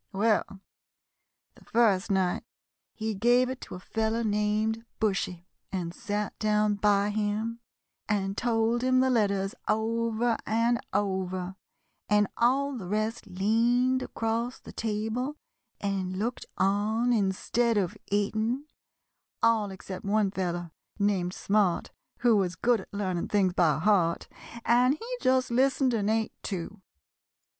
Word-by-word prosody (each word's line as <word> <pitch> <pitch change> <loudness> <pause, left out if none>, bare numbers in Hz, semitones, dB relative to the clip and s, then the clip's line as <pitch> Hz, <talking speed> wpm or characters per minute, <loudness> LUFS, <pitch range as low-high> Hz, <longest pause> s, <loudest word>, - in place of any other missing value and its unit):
"Well, 200 -1 +1 0.9
the - - -19
first 220 -4 +2
night 190 -2 +1 0.5
he 220 -1 -3
gave 240 +5 +3
it 260 0 -5
to - - -8
a - - -7
fellow 220 +4 -1
named 215 +1 0 0.2
Bushy 190 -5 -1 0.3
and 175 -3 -3
sat 205 +2 -3
down 210 -1 +2
by 205 0 +2
him 215 +2 -1 0.5
and 195 -1 0
told 230 0 +1
him 255 0 +3
the 260 0 +3
letters 200 -4 +1
over 230 +1 +1
and 230 +2 +1
over, 190 -2 -1 0.5
and 210 0 +4
all 270 +4 +2
the 200 -7 -6
rest 215 +3 -2
leaned 235 +7 +2
across 230 +2 -2
the - - -11
table 225 +6 -2 0.4
and 190 -2 -2
looked 230 +5 -3
on 215 +5 +2
instead 225 +3 +1
of 185 -4 0
eating, 220 +6 0 0.8
all 225 -3 +3
except 190 0 -8
one 200 -1 +1
fellow, 175 -3 -3 0.3
named 195 -3 0
Smart, 200 -4 +1 0.3
who 240 -2 +5
was 185 -3 +1
good 240 -2 +2
at - - -15
learning 185 -4 -2
things 195 -3 +2
by 160 -6 +3
heart, 170 -1 +2 0.4
and 250 +3 +4
he 485 +8 -6
just 255 -1 +2
listened 260 +1 +3
and 210 -2 0
ate, 220 0 0
too. 195 +1 -5
215 Hz, 130 wpm, -28 LUFS, 195-230 Hz, 0.9 s, who